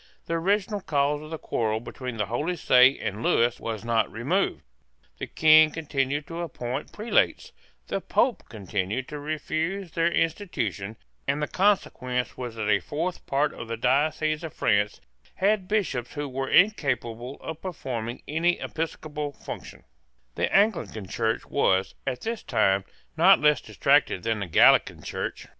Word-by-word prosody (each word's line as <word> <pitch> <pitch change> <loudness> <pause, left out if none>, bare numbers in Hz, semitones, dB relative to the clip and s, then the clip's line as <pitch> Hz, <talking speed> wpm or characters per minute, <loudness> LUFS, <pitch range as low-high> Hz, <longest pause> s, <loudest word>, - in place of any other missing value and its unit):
The - - -3
original 200 +4 0
cause 145 -2 0
of 155 - -10
the 160 - -4
quarrel 110 -6 -1
between 125 0 -7
the 105 - 0
Holy 145 - -2
See 130 -4 +5
and 105 +2 -4
Lewis 120 0 +2
was 110 -1 -5
not 115 -1 +1
removed. - - -1 0.6
The - - -4
King 155 0 +6
continued 145 -2 -2
to 170 +1 -6
appoint 130 -4 -5
prelates: 215 +2 0 0.3
the - - -3
Pope 255 - +1
continued 105 +3 -3
to 150 - -6
refuse 160 +5 -3
their 165 +1 +1
institution: 120 - -2 0.3
and 140 +1 +1
the 150 - -1
consequence 125 -11 0
was 120 -3 -6
that 110 -2 -3
a 105 -2 +4
fourth 165 - -4
part 140 +2 +1
of 115 - -8
the 115 0 -4
dioceses 155 +5 +1
of 160 - -7
France 105 -1 +1 0.3
had 195 -1 +1
bishops 190 - -1
who 145 -1 -3
were 135 0 -3
incapable 130 - +1
of 160 0 -7
performing 125 -10 -5
any 170 +3 +1
episcopal 150 -2 -4
function, - - -9 0.5
The - - -1
Anglican 195 - +1
Church 115 0 -1
was, 95 -9 +1
at 125 -2 -2
this 225 0 -3
time, 95 0 +1 0.3
not 185 +4 +7
less 150 0 +3
distracted 140 -9 +2
than 115 -1 0
the 100 - -4
Gallican 80 - +4
Church. - - -5
145 Hz, 150 wpm, -26 LUFS, 115-165 Hz, 0.6 s, not